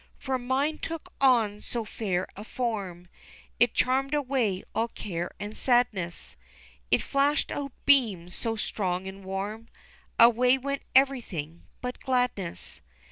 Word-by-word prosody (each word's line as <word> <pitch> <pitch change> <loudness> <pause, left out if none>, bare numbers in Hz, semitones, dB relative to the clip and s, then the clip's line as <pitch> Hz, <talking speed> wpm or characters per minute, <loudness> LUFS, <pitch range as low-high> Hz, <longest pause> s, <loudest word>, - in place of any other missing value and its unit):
For 265 -1 -2
mine 270 +5 0
took 330 -1 -6
on 225 -6 +4
so 235 -2 -3
fair 190 -4 -2
a 205 - -7
form 200 -8 -3 0.5
It 240 -1 +4
charmed 270 +3 +2
away 255 -9 0
all 230 - +1
care 175 -6 -4
and 205 +1 -6
sadness, 205 - +1 0.5
It - - +3
flashed 280 +1 +1
out 280 -1 -3
beams 210 -11 +3
so 225 -1 -2
strong 190 -4 -2
and 190 +1 -8
warm, 200 +4 -4 0.5
Away 245 +2 +6
went 280 +1 -3
everything 220 - +1
but 250 0 -4
gladness. 245 -9 -2
230 Hz, 130 wpm, -28 LUFS, 195-260 Hz, 0.5 s, Away